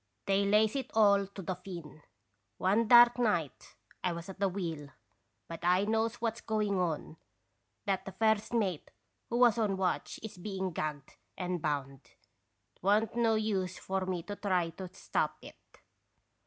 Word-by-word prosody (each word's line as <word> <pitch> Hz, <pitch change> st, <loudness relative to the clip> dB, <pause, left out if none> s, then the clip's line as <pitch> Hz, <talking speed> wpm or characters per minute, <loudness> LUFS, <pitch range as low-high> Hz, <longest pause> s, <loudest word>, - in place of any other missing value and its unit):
They 195 Hz, 0 st, +2 dB
lays 210 Hz, +3 st, +3 dB
it 270 Hz, -, -3 dB
all 200 Hz, -2 st, +5 dB
to 195 Hz, 0 st, -9 dB
the 185 Hz, -, -2 dB
Finn. 175 Hz, -5 st, -9 dB, 0.6 s
One 210 Hz, +5 st, +2 dB
dark 240 Hz, 0 st, +8 dB
night 175 Hz, -, -1 dB, 0.3 s
I 180 Hz, -, +1 dB
was 170 Hz, +2 st, -7 dB
at 195 Hz, -, -9 dB
the 200 Hz, -1 st, +2 dB
wheel, 165 Hz, -6 st, -4 dB, 0.6 s
but 165 Hz, -1 st, -7 dB
I 180 Hz, +2 st, +4 dB
knows 225 Hz, +2 st, +1 dB
what 230 Hz, -2 st, -2 dB
's -, -, -10 dB
going 210 Hz, -3 st, 0 dB
on, 160 Hz, -2 st, -2 dB, 0.7 s
that 195 Hz, -2 st, -1 dB
the 195 Hz, -, -6 dB
first 220 Hz, +2 st, +1 dB
mate, 200 Hz, -9 st, -1 dB, 0.4 s
who 235 Hz, -, -1 dB
was 240 Hz, -2 st, +5 dB
on 205 Hz, -3 st, +1 dB
watch, 185 Hz, -1 st, -1 dB
is 215 Hz, -4 st, -8 dB
being 190 Hz, -1 st, -3 dB
gagged 150 Hz, -3 st, -5 dB, 0.2 s
and 180 Hz, -2 st, -2 dB
bound. 140 Hz, -3 st, -2 dB, 0.8 s
It -, -, -33 dB
wa' 205 Hz, +3 st, +4 dB
n't 225 Hz, 0 st, -6 dB
no 230 Hz, -2 st, +3 dB
use 195 Hz, -4 st, -1 dB
for 190 Hz, -1 st, -3 dB
me 180 Hz, -3 st, -2 dB
to 205 Hz, -, -6 dB
try 180 Hz, -5 st, 0 dB
to 185 Hz, +1 st, -8 dB
stop -, -, -2 dB
it. -, -, -13 dB
195 Hz, 170 wpm, -31 LUFS, 175-220 Hz, 0.8 s, dark